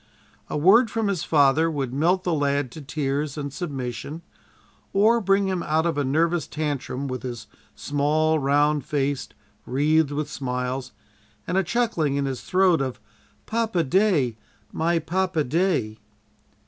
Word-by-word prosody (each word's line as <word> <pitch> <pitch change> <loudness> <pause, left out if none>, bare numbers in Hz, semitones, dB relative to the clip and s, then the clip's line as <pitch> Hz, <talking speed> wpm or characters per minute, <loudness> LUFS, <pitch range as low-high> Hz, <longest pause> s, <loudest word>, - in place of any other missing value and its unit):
A - - -2
word 210 +10 +5
from 220 -1 -1
his 190 -5 -1
father 150 +1 +3
would 135 -5 -3
melt 175 +6 +2
the 175 - 0
lad 140 -3 0
to 155 - -9
tears 145 0 -2
and 140 -2 -4
submission, 140 -1 -5 0.7
or 220 +4 +4
bring 195 0 +2
him 185 -2 -1
out 160 +1 0
of 170 - 0
a 145 - 0
nervous 165 +4 +1
tantrum 140 -3 -3
with 130 -1 -4
his 120 -4 -6 0.3
small 155 +2 +1
round 145 +1 +2
face 140 -2 -2 0.3
wreathed 150 +3 +2
with 145 +1 -3
smiles, 130 -2 -3 0.5
and 180 - -2
a 190 - +4
chuckling 190 - 0
in 140 0 0
his 135 -2 -3
throat 185 -4 +3
of 130 -4 -3 0.5
"Papa 220 -6 0
day, 155 - +2 0.4
my 170 +1 +1
papa 175 0 0
day!" 145 - 0
150 Hz, 145 wpm, -24 LUFS, 135-175 Hz, 0.7 s, word